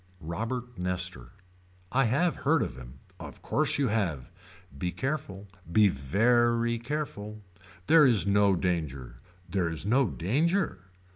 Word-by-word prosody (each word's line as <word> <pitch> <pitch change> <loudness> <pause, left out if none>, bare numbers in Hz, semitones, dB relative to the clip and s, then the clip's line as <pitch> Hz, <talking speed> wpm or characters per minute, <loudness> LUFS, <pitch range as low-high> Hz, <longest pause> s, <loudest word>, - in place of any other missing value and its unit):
Robert 115 +7 -5
Nestor. 90 0 -1 0.6
I 135 0 +3
have 150 +9 +1
heard 155 +2 +2
of - - -5
him. 65 +1 -12 0.2
Of - - -10
course - - +1
you 140 -4 +1
have. 85 - -2 0.4
Be 90 +6 -3
careful. 115 - -4 0.2
Be 105 +3 +5
very 115 - +1
careful. 110 -6 -5 0.4
There 160 +1 +6
is 115 -6 +4
no 100 -1 +3
danger. 70 -10 -3 0.3
There 90 -2 -1
is 80 +2 -6
no 125 +4 +3
danger. 155 - 0
105 Hz, 130 wpm, -28 LUFS, 90-125 Hz, 0.6 s, There